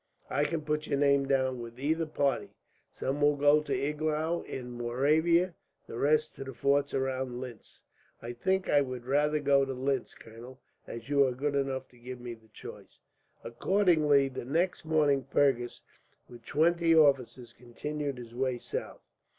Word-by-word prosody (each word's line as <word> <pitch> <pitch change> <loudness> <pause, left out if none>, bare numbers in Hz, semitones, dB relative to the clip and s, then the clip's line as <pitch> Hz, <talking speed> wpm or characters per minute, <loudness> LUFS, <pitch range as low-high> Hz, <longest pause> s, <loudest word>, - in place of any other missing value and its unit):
I 145 - +1
can 165 0 -2
put 150 0 -2
your 140 - 0
name 140 -1 +3
down 130 -2 +1
with 120 +1 -9
either 160 +4 0
party. 140 -4 -1 0.4
Some 140 +2 -3
will 145 0 +4
go 145 +1 +4
to 150 - -8
Iglau 155 +3 -1
in 125 -2 -6
Moravia, 155 +9 +2 0.3
the - - -9
rest 155 +2 +2
to - - -5
the 135 -2 -9
forts 140 +3 +1
round 130 -2 -2
Linz." 125 -4 -10 0.4
"I 120 +1 -7
think 190 +10 0
I 145 - +4
would 130 -3 -5
rather 150 +3 +2
go 140 -1 +3
to 135 0 -3
Linz, 130 0 -2
colonel, 120 +4 -13 0.3
as 115 0 -8
you 140 -1 +4
are 130 - -2
good 140 +3 -2
enough 135 -2 -2
to 125 - -21
give 125 +1 -8
me 120 -1 -6
the 110 -1 -17
choice." 110 - -12 0.5
Accordingly, 150 - +3
the 130 -2 -6
next 165 +7 -1
morning 150 -4 +2
Fergus, 125 -5 +1 0.5
with 120 -2 -13
twenty 165 +2 +3
officers, 130 -5 +2
continued 140 +3 -5
his 120 -2 -10
way 130 0 -1
south. - - -6
140 Hz, 165 wpm, -30 LUFS, 125-150 Hz, 0.5 s, will